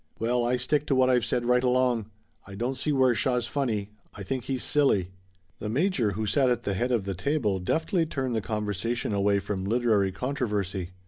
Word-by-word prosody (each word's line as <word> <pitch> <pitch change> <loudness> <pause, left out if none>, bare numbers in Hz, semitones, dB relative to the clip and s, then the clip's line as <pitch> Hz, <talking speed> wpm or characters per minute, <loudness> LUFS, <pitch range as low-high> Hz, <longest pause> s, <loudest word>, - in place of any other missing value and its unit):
"Well, 120 +2 0
I 125 +1 +1
stick 145 +4 0
to 135 - +2
what 130 0 +4
I've 125 -2 +2
said 120 0 0
right 125 +1 +3
along. 125 -3 +1 0.4
I 100 - -9
don't 120 +6 -1
see 135 +4 -2
where 130 -3 +4
Shaw's 120 +2 0
funny. 115 -7 -2 0.2
I 100 - -7
think 125 +6 -3
he's 130 -2 -2
silly." 105 -11 +2 0.5
The 105 - -4
major 130 - +1
who 110 +3 -2
sat 130 +4 +2
at 120 -1 0
the 100 - -1
head 120 +6 -1
of 115 -6 +1
the 100 - -2
table 105 - 0
deftly 160 - 0
turned 130 -5 -2
the 110 - 0
conversation 105 +2 -2
away 100 0 +2
from 95 -1 -3
literary 105 -2 +2
controversy. 105 -6 -2
120 Hz, 200 wpm, -27 LUFS, 100-130 Hz, 0.5 s, what